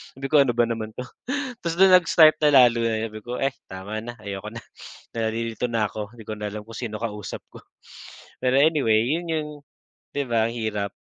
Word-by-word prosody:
Sabi 135 +1 -7
ko, 150 - +6
"Ano 130 -4 +3
ba 120 - +4
naman 110 -2 -4
'to." 125 - -5 0.6
Ta's 170 -1 -3
do'n 190 +2 +6
nag-start 155 -2 +5
na 135 -3 +8
lalo 120 -1 +3
na 110 0 -2
sabi 110 - -8
ko, 120 +3 -6
"Eh, 135 - +2 0.2
tama 95 +3 -6
na, 120 +2 -8
ayoko 100 +1 -6
na, 115 - -8 0.5
nalilito 115 +1 -2
na 115 -2 0
ako, 105 +2 -5
hindi 115 - -11
ko 110 - -5
na 105 - -3
alam 105 +1 -6
kung 115 +1 -10
sino 110 -3 -4
kausap 105 -3 -5
ko." - - -12 0.8
Pero 125 0 +2
anyway, 140 -8 +3
yun 165 +8 -1
yung 155 -1 -2 0.6
'di 140 -1 -1
ba 115 -2 +2
ang - - -5
hirap? 105 -3 -2
115 Hz, 205 wpm, -24 LUFS, 110-135 Hz, 0.8 s, na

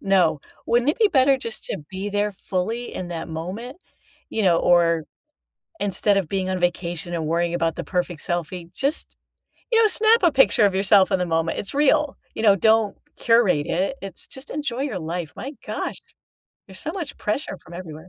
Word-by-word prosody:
no, 175 -6 +2 0.3
wouldn't 240 +4 +3
it - - -5
be 440 -2 +5
better 275 -5 +4
just 230 -3 -5
to 195 - -3
be 190 +1 -4
there 205 +1 0
fully 200 +5 -3
in 180 - -5
that 165 -2 -5
moment?" 185 - -6 0.5
You 220 - -2
know, 175 -3 +5
or, 170 -2 +3 0.8
instead 205 0 +2
of 190 -5 0
being 190 -1 -1
on 185 - -1
vacation 175 0 -2
and 160 -2 -2
worrying 170 +2 0
about 165 -2 0
the - - -4
perfect 180 -3 -2
selfie, 175 0 -3
just, 280 +3 -2 0.6
you 455 -1 +5
know, 440 - +6
snap 440 +1 +4
a 345 - +5
picture 270 -6 +5
of 195 -2 +1
yourself 195 0 +4
in 190 - +2
the 180 - 0
moment, 165 -1 0
it's 200 - -4
real, 295 0 +2 0.2
you - - -3
know, 205 -3 +6
don't 220 0 +3 0.2
curate 225 -11 +3
it, 190 +9 0
it's 195 -1 -5
just 265 +1 -10
enjoy 275 -4 -3
your 245 -10 -3
life, 165 -1 -4
my 270 - -6
gosh. - - -4 0.7
There's 190 -1 -10
so 310 - -3
much 350 -5 -5
pressure 210 0 -2
from 175 - -13
everywhere. 165 -1 -9
195 Hz, 190 wpm, -23 LUFS, 175-245 Hz, 0.8 s, know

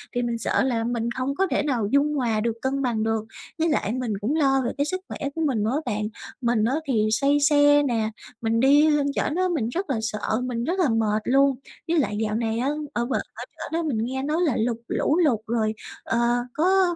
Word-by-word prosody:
thì 245 - +1
mình 235 -1 -1
sợ 230 - +1
là 240 -4 0
mình 235 0 -2
không 260 +3 -2
có 385 +5 +1
thể - - +1
nào 250 -8 0
dung 290 +2 +2
hòa 235 -6 0
được, 230 +1 0
cân 270 +1 -1
bằng 235 -5 0
được. 225 -1 0 0.4
Với 330 +1 +2
lại 280 -8 0
mình 250 -4 -2
cũng 265 +9 0
lo 270 -3 +3
về 235 - 0
cái 285 - +1
sức 370 +4 -3
khỏe 280 - -4
của 325 - -2
mình 225 -7 0
nữa 220 - 0
á - - -2
bạn. 210 0 -2 0.3
Mình 235 -3 +1
á 255 +4 +1
thì 220 -5 +2
say 280 +6 +3
xe 290 0 +5
nè, 230 -5 0 0.3
mình 225 0 +1
đi 290 +4 +5
lên 295 -2 +2
trển 310 - 0
á 370 - +1
mình 230 -7 -1
rất 360 +7 -3
là 265 - 0
sợ, 220 +1 -2
mình 240 -2 -2
rất 355 +7 -1
là 340 -7 +3
mệt 220 -2 +1
luôn. 275 +1 +4 0.3
Với 330 -1 +2
lại 210 -6 0
dạo 215 0 -1
này 225 0 -1
á, 260 +3 0 0.2
ở 240 - 0
bển 255 - -1
ở - - -7
trển - - -7
á 335 - -1
mình 265 -7 -1
nghe 265 +2 -3
nói 300 +3 0
là 300 -9 +2
lụt 230 +1 0
lũ 305 - +1
lụt 295 -11 +3
rồi, 220 -1 0 0.3
ờ, 230 - 0 0.3
có 365 +2 +3
255 Hz, 245 wpm, -24 LUFS, 225-290 Hz, 0.4 s, xe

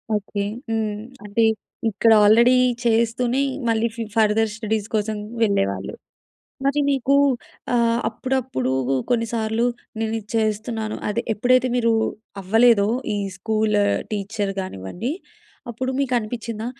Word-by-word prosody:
Okay. 205 0 -2 0.3
హ్మ్. 215 -2 -1 0.3
అంటే 210 +3 +1 0.5
ఇక్కడ 225 +2 +3
ఆల్రెడీ 235 +4 +6 0.3
చేస్తూనే 235 +2 +1 0.3
మళ్ళీ 225 +1 +2
ఫు 230 - -3
ఫర్దర్ 220 0 +3
స్టడీస్ 215 -1 -2
కోసం 215 0 -1 0.3
వెళ్ళేవాళ్ళు. 100 - 0 0.7
మరి 280 +2 +2
నీకు 275 -1 +2 0.6
ఆహ్, 235 0 +3
అప్పుడప్పుడూ 255 - -2 0.4
కొన్నిసార్లు 230 -1 0 0.3
నేను 225 0 -1
ఇది 210 - -11
చేస్తున్నాను, 220 0 -1
అదే 225 +3 -1
ఎప్పుడైతే 250 +4 +3
మీరూ 230 -2 +2 0.5
అవ్వలేదో 220 +1 +4 0.3
ఈ - - -1 0.2
స్కూలు 215 0 +1 0.3
టీచర్ 205 -1 -2
గానివ్వండి, 180 - -5 0.6
అప్పుడు 255 +3 -3
మీకు 270 -2 0
అనిపించిందా? 225 0 -5
220 Hz, 110 wpm, -22 LUFS, 210-235 Hz, 0.7 s, ఆల్రెడీ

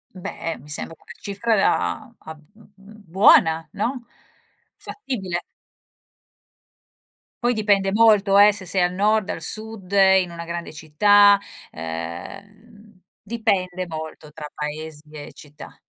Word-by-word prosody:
Beh, 165 -2 -6
mi 145 +4 -16
sembra 155 +2 -5
una - - -16
cifra 205 +3 -1
da 235 +5 0
abb 160 -1 -11
b 220 - -20
b 205 +2 -17
buona, 160 -4 +5
no, 240 +4 -3 0.7
fattibile. 195 - -5 2.0
Poi 245 0 +2
dipende 205 -3 +1
molto, 210 -2 +4
eh, 205 +1 +8
se 195 -2 -8
sei 185 +1 -1
al 180 0 +1
Nord, 210 +1 +1
al 165 - -4
Sud, 215 -1 -7
in 190 -2 +4
una 170 0 -7
grande 170 -1 -6
città, 205 +7 +4 0.3
ehm, 200 - -9 0.2
dipende 185 -5 -2
molto, 160 -1 -8
tra 150 0 -8
paesi 150 0 -7
e 150 -1 -10
città. 150 0 -14
190 Hz, 125 wpm, -22 LUFS, 160-210 Hz, 2.0 s, eh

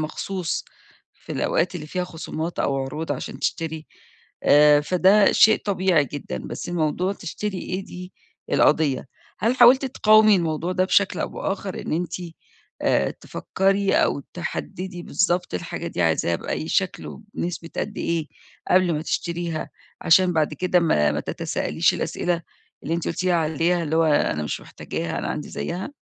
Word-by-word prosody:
مخصوص 170 +3 -3 0.5
في - - -10
الأوقات - - 0
اللي 155 -3 -6
فيها 180 +3 -2
خصومات 165 -1 -5
أو 135 - +1
عروض 150 +4 -3
عشان - - -6
تشتري، 160 -1 -3 0.6
آآ 145 0 +6
فده 190 +5 +4
شيء 220 0 +5
طبيعي 185 -6 +2
جدًا، 135 - -6
بس - - -6
موضوع 175 +3 0
تشتري 195 +2 -5
إيه 185 +1 -4
دي، 180 +1 -9 0.4
القضيّة. 145 -4 +2 0.3
هل 230 +5 +1
حاولتِ 255 +3 +7
تقاومي 215 -5 +5
الموضوع 165 +1 -1
ده 185 0 +2
بشكل 195 +1 +2
أو - - -1
بآخَر 195 -1 -4
إن - - -5
أنتِ 170 +1 -2 0.7
آآ، - - +2
تفكّري 195 +1 0
أو 140 - +2
تحدِّدي 180 +1 -5
بالضبط 180 -1 0
الحاجة 175 -1 -4
دي 90 - -2
عايزاها 85 +1 +1
بأي 155 - -4
شكل 190 -2 -1
وبنسبة 175 -5 -6
قد 210 - -3
إيه 165 -3 -1 0.4
قبل 185 -2 +4
ما 150 - -2
تشتريها، 170 -1 -3 0.3
عشان 180 +2 +5
بعد 155 -2 +1
كده 180 -1 +2
ما 75 - +2
ما - - -1
تتساءليش - - 0
الأسئلة 175 -1 -2 0.4
اللي 165 - -2
أنت 170 - -2
قُلتِ 185 - -3
لي 185 - +3
عليها 165 +2 +1
اللي 160 0 -1
هو: 165 - +4
أنا 145 - +2
مش 75 - -3
محتاجاها 85 0 -5
أنا - - -3
عندي 150 - -4
زيّها؟ 185 +10 -4
175 Hz, 155 wpm, -23 LUFS, 155-185 Hz, 0.7 s, حاولتِ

